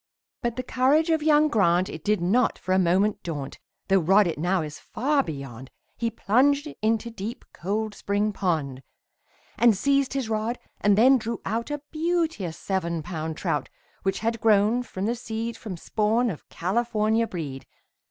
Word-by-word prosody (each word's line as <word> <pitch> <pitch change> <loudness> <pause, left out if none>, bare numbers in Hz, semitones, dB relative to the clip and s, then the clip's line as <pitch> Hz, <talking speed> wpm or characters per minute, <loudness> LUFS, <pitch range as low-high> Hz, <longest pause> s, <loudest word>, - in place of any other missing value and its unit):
But 235 -1 -1
the 255 - -3
courage 285 +7 +2
of 320 -1 +2
young 305 0 +4
Grant, 185 - +3
It 160 - -8
did 210 -1 +1
not 220 +8 +2
for 185 - -2
a 190 - +4
moment 190 +4 +2
daunt, 145 -6 -5 0.3
Though 195 0 +4
rod 195 +5 +5
it 165 -4 -2
now 175 +1 +1
is 150 -1 -7
far 280 +4 0
beyond, 135 - -7 0.3
He 230 - -1
plunged 275 +7 +2
into 225 +2 0
deep, 225 +1 -6
cold 210 +4 -2
spring 205 +1 -1
pond. 155 -9 -1 0.8
And 230 -3 +5
seized 275 +3 +2
his 270 -4 -2
rod 220 +2 -1 0.2
and 205 0 +3
then 260 +4 +6
drew 230 0 -4
out 230 +5 -2
A 295 -1 -4
beauteous 320 - -1
seven 170 -4 -2
pound 160 -2 -4
trout, - - -2 0.3
Which 195 0 -1
had 230 0 -1
grown 215 +2 +4
from 195 -5 -5
the 230 - +1
seed 230 -1 -4
From 195 -6 -7
spawn 220 +6 +1
of 160 - -10
California 220 +3 0
breed. 145 -8 -6
215 Hz, 170 wpm, -25 LUFS, 180-240 Hz, 0.8 s, then